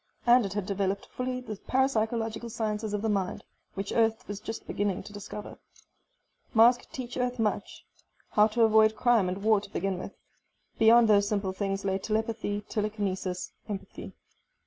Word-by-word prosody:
And 240 -3 +5
it 195 - -7
had 205 -2 -2
developed 195 0 -1
fully 255 0 -4
the 220 -4 -7
parapsychological 230 -2 0
sciences 215 -1 -2
of 210 - -3
the - - +1
mind, 195 -3 -1 0.3
which 195 0 -4
Earth 225 +1 +1
was 205 -1 -5
just 225 +1 -6
beginning 200 -2 -2
to 205 - -11
discover. 205 0 -8 1.0
Mars 235 +2 +7
could - - -19
teach 250 -2 -6
Earth 250 0 -1
much. 220 -2 -2 0.5
How 210 0 +5
to 230 +2 +1
avoid 220 0 +5
crime 225 -4 +3
and 190 +2 -4
war 215 -2 +4
to - - -11
begin 195 -2 -2
with. - - -8 0.6
Beyond 230 +1 +7
those 205 -1 +4
simple 200 -2 -1
things 195 0 -2
lay 190 0 0
telepathy, 215 -1 -2
telekinesis, 205 -4 -3 0.2
empathy.... 200 -2 -7
215 Hz, 165 wpm, -28 LUFS, 200-225 Hz, 1.0 s, Mars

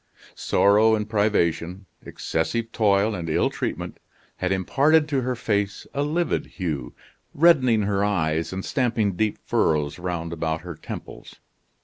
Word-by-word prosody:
Sorrow 105 +3 +3
and 105 -1 -3
privation, 95 -4 0 0.2
excessive 115 -1 -2
toil 105 -1 +2
and 85 -4 -4
ill 80 - +1
treatment, - - -4 0.4
had 90 0 -1
imparted 145 - +3
to 140 -3 +1
her 125 0 -2
face 105 -4 -2
a 140 - -1
livid 160 +4 -1
hue, 75 - -4 0.4
reddening 130 -9 +4
her 100 0 0
eyes 80 -5 0
and 95 0 -5
stamping 115 -5 0
deep 105 +2 0
furrows 75 +1 0
round 85 -2 -4
about 80 -1 -2
her 90 0 -7
temples. 75 - -9
100 Hz, 135 wpm, -24 LUFS, 85-115 Hz, 0.4 s, reddening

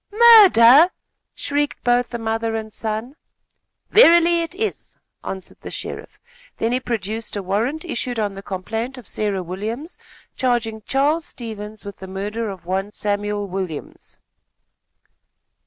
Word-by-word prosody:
"Murder!" 320 - +8 0.5
shrieked 290 0 -2
both 245 0 +2
the 240 - -4
mother 225 0 -2
and 220 -1 -5
son. 220 +5 -4 0.8
"Verily, 340 -5 +6
it 335 +2 -5
is," 435 +2 -4 0.3
answered 190 -1 -7
the - - -7
sheriff. - - -7 0.4
Then 225 - 0
he 250 - +1
produced 225 -3 -4
a 200 - -3
warrant 230 - -1
issued 250 -6 -3
on 210 -2 -1
the 195 - -8
complaint 225 +7 -4
of 240 -6 -11
Sarah 200 -3 -2
Williams, 220 - -6 0.4
charging 235 -4 0
Charles 295 +5 +1
Stevens 215 -6 -8
with 200 - -8
the 190 - -9
murder 205 +4 -4
of 190 -3 -9
one 190 +3 -2
Samuel 205 0 -2
Williams. 185 -5 -6
225 Hz, 135 wpm, -21 LUFS, 205-255 Hz, 0.8 s, Murder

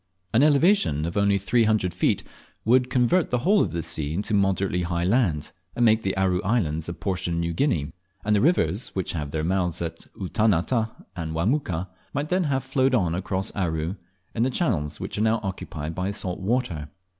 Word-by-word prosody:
An 115 - +5
elevation 150 - +4
of 85 - -4
only 100 -1 +3
three 115 +4 +2
hundred 105 -5 +1
feet 90 - +1 0.4
would 125 +2 +4
convert 125 +8 +2
the 125 - +1
whole 195 - +3
of - - 0
this 85 -1 -3
sea 75 0 -2
into 105 +3 -2
moderately 95 -2 +1
high 85 0 -1
land, 90 - +1 0.2
and 120 - +3
make 110 0 +4
the 95 -2 -2
Aru 95 -1 +2
Islands 85 -8 0
a - - -3
portion 90 -3 -2
of - - -1
New 85 0 -1
Guinea; 80 - 0 0.3
and 105 0 +3
the 100 - +3
rivers 120 - +2
which 95 -2 -1
have 75 -4 -4
their 75 +1 -2
mouths 90 -1 0
at 85 -1 -5
Utanata 110 +3 +1 0.3
and 80 -2 -4
Wamuka, 95 - 0 0.3
might 145 +2 -1
then 185 -1 +1
have 135 -3 0
flowed 130 0 +2
on 90 -8 +1
across 95 +3 -2
Aru, 80 -2 -1 0.4
in 115 - -2
the 125 - +3
channels 85 - -1
which - - -4
are - - +1
now 110 +1 +2
occupied 80 -5 -5
by 90 +3 -2
salt 95 -3 -3
water. 95 - -1
95 Hz, 195 wpm, -25 LUFS, 85-120 Hz, 0.4 s, An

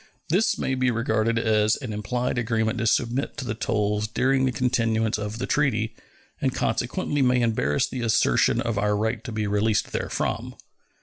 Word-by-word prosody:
This 190 +8 +2
may 135 - -1
be 130 -1 +1
regarded 115 -1 0
as 110 -1 +2
an 125 -6 -6
implied 120 +4 -2
agreement 110 -1 0
to 115 - 0
submit 120 +5 0
to 130 - -4
the 110 - -2
tolls 105 -1 -1
during 130 +4 +1
the 130 - +1
continuance 115 -3 0
of 105 +1 -4
the 125 - -2
treaty, 115 -6 0 0.5
and - - 0
consequently 145 -1 -1
may 125 -1 +3
embarrass 75 - +1
the 130 - -5
assertion 115 -1 +2
of 115 -3 -1
our 105 0 +1
right 110 +1 -1
to 120 - -6
be 110 -1 -2
released 105 +1 +1
therefrom. - - -3
115 Hz, 175 wpm, -25 LUFS, 110-125 Hz, 0.5 s, may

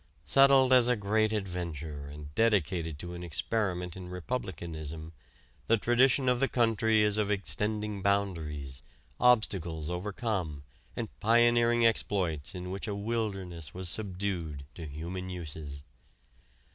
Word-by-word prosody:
Settled 135 -1 +6
as 125 -2 +6
a 125 - +4
great 110 +1 +1
adventure 85 -8 -4
and 75 0 -9
dedicated 90 -7 +1
to 85 +3 -7
an 90 0 -7
experiment 90 +1 -1
in 90 -1 -8
republicanism, 80 - -5 0.5
the 115 - +4
tradition 125 +4 +3
of 125 -1 +3
the 135 - +3
country 110 -3 +3
is 105 0 +2
of 105 -1 +1
extending 105 0 0
boundaries, 80 -9 -1 0.4
obstacles 90 -10 +2
overcome, 90 -5 -3 0.3
and 115 - -3
pioneering 120 +1 +4
exploits 95 -9 0
in 90 0 -5
which 100 +4 -5
a 105 - -2
wilderness 100 -7 -3
was 90 -1 -3
subdued 90 -8 -3
to 80 -2 -7
human 85 +5 -5
uses. 75 -5 -6
95 Hz, 125 wpm, -30 LUFS, 80-110 Hz, 0.5 s, Settled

